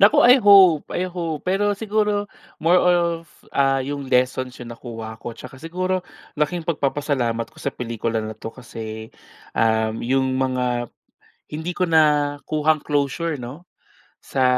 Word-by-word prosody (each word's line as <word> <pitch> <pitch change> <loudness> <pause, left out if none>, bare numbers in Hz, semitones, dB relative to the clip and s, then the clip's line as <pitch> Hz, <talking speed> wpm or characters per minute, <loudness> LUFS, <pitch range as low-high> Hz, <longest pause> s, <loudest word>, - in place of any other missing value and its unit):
Naku, 200 +2 +6
I 250 +2 +8
hope-I 190 - +6
hope 165 -4 -4
pero 205 +2 +2
siguro 210 -1 0 0.4
more 175 +2 +5
of 170 -2 +2 0.3
ah, 135 -1 +3
yung 140 0 -4
lessons 125 0 +1
'yong 120 -1 -8
nakuha 115 -2 -8
ko 120 - -6
'tsaka 130 +1 -11
siguro 185 +3 -2 0.4
laking 160 +3 0
pagpapasalamat 135 -6 -1
ko - - -20
sa - - -3
pelikula 115 -1 -2
na 110 0 -5
'to 115 +1 -7
kasi 110 -3 -8 0.5
ah, 110 0 +2
'yong 130 +2 0
mga 125 -2 -1 0.6
hindi 160 +4 -4
ko 180 0 -1
nakuhang 150 -1 +2
closure 145 +2 -1
'no, 135 +9 -8 0.6
sa 130 - -1
145 Hz, 135 wpm, -22 LUFS, 125-170 Hz, 0.6 s, I